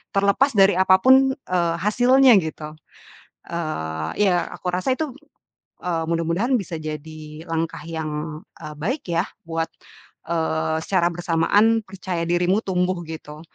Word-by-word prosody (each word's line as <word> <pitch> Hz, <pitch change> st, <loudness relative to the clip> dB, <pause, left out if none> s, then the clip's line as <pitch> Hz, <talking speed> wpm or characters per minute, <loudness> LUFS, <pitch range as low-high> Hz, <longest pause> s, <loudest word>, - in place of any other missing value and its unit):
terlepas 200 Hz, +8 st, +3 dB
dari 195 Hz, -1 st, +6 dB
apapun, 260 Hz, +9 st, +5 dB
eee, 175 Hz, -, -1 dB
hasilnya 245 Hz, +5 st, +5 dB
gitu. 155 Hz, -1 st, -7 dB, 0.7 s
Eee, 80 Hz, -, -3 dB
ya 180 Hz, -4 st, +2 dB
aku 180 Hz, -, -6 dB
rasa 185 Hz, +9 st, 0 dB
itu, 310 Hz, -5 st, -3 dB, 0.7 s
eee, 170 Hz, -2 st, -1 dB
mudah-mudahan 170 Hz, +10 st, +1 dB
bisa 180 Hz, -5 st, -5 dB
jadi 155 Hz, 0 st, -7 dB, 0.3 s
langkah 165 Hz, -1 st, -2 dB
yang, 155 Hz, -1 st, -4 dB, 0.2 s
e -, -, -8 dB
baik 215 Hz, -, -3 dB
ya 170 Hz, +2 st, +1 dB, 0.2 s
buat, 165 Hz, 0 st, -1 dB, 0.6 s
eee, 160 Hz, -1 st, 0 dB
secara 175 Hz, -3 st, +2 dB
bersamaan 180 Hz, +7 st, +2 dB
percaya 185 Hz, -3 st, -4 dB
dirimu 175 Hz, +4 st, +2 dB
tumbuh 180 Hz, -1 st, 0 dB
gitu. 155 Hz, -1 st, -9 dB
175 Hz, 125 wpm, -22 LUFS, 160-200 Hz, 0.7 s, dari